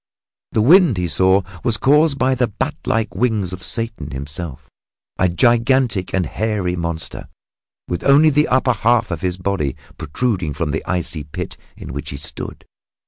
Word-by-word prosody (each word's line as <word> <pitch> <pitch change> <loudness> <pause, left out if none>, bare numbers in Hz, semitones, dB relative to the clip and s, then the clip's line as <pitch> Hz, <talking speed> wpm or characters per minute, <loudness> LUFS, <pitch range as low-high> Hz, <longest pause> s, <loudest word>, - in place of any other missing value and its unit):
The 110 - +2
wind, 165 - +6
he 90 -1 0
saw, 95 +4 +3 0.2
was 115 -4 +2
caused 145 +3 +3
by 130 +1 +2
the 125 -1 +1
bat 105 - -3
like 110 -5 0
wings 105 -3 0
of 90 - -7
Satan 115 - -2
himself 70 +1 -6 0.5
a 95 - +3
gigantic 120 0 +2
and 95 -2 0
hairy 95 0 -1
monster, 85 -1 -4 0.6
with 90 -1 -3
only 145 +3 +6
the 150 +1 +3
upper 130 0 +2
half 115 -1 +1
of 80 -2 -3
his 90 -1 -1
body 90 -8 -1 0.2
protruding 90 - -2
from 80 -3 -2
the 80 - -2
icy 85 -4 -2
pit 75 - -6 0.2
in - - -8
which 70 0 -5
he - - -6
stood. - - -6
95 Hz, 165 wpm, -19 LUFS, 85-125 Hz, 0.6 s, wind